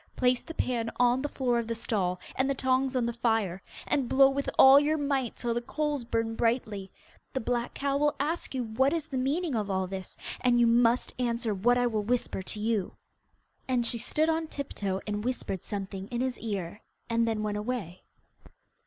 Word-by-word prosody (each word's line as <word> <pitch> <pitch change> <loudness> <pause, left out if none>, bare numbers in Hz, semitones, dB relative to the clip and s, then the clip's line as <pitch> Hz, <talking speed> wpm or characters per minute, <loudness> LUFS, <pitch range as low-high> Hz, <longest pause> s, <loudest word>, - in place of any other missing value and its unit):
Place 250 -1 +2
the 325 - -9
pan 235 -3 -1
on 245 +1 +4
the 290 - -2
floor 245 -4 0
of 230 - -3
the 230 - -2
stall, 190 -5 -1 0.2
and 260 +1 +1
the 275 - +1
tongs 260 0 +1
on 250 -2 +2
the 235 - -1
fire, 225 -6 0 0.2
and 270 -4 0
blow 270 0 +6
with 280 +1 -2
all 270 +1 +9
your 300 +2 +1
might, 275 -4 -1
till 235 -1 -1
the 240 - -1
coals 295 +1 -2
burn 230 -1 -1
brightly. 220 -4 -1 0.4
The 265 - 0
black 240 0 -2
cow 280 0 0
will 295 +1 +2
ask 300 0 -2
you 255 - 0
what 250 +6 +1
is 330 -3 -1
the 265 - -4
meaning 295 +5 0
of 210 -3 -1
all 190 -1 0
this, 190 0 -7 0.2
and 245 -1 +3
you 240 - +6
must 235 +1 +3
answer 235 -3 0
what 240 +6 +3
I 245 - +2
will 220 -3 0
whisper 235 -2 -1
to 200 +3 -6
you.' 215 -3 0 0.7
And 250 -2 +1
she 235 0 -2
stood 305 +7 0
on 325 0 0
tip 280 -2 -5
toe 195 -1 -2
and 210 0 -3
whispered 235 -7 -3
something 195 -1 -5
in 240 +1 -3
his 260 -1 -2
ear, 205 -3 -4 0.3
and 230 0 +1
then 220 -1 -1
went 210 -1 -1
away. 210 -6 -4
240 Hz, 205 wpm, -29 LUFS, 215-265 Hz, 0.7 s, all